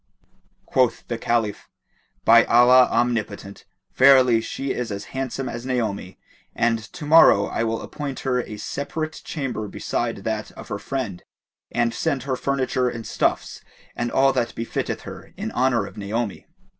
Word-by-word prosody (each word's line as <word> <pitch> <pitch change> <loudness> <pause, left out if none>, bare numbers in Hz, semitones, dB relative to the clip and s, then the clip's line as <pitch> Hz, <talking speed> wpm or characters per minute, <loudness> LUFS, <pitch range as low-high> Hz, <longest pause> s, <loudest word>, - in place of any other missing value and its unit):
Quoth 130 -3 +1
the 120 - -2
Caliph, 115 -4 -1 0.6
"By 115 +1 +7
Allah 125 +2 +6
Omnipotent, 115 -4 -2 0.3
verily 130 -3 +6
she 135 +4 -4
is 120 -3 -4
as 100 0 -4
handsome 135 0 -3
as 120 0 -5
Naomi, 110 -7 -3 0.4
and 115 -1 +2
to 155 - -7
morrow 145 -10 +7
I - - -2
will 115 0 -2
appoint 140 -3 -6
her 125 -2 0
a 105 -3 -8
separate 155 +8 -4
chamber 130 -8 -4
beside 115 +1 -3
that 110 0 -3
of - - -11
her 100 - -3
friend 105 -5 -4 0.5
and 120 -1 +1
send 140 -6 -1
her 135 -1 -1
furniture 130 -1 0
and 115 -2 -7
stuffs - - -1 0.3
and 120 0 -2
all 135 0 +4
that 120 -3 -1
befitteth 115 - -3
her, - - -11
in - - -4
honour 125 -4 +1
of - - -12
Naomi." 105 +1 -3
120 Hz, 155 wpm, -23 LUFS, 110-130 Hz, 0.6 s, By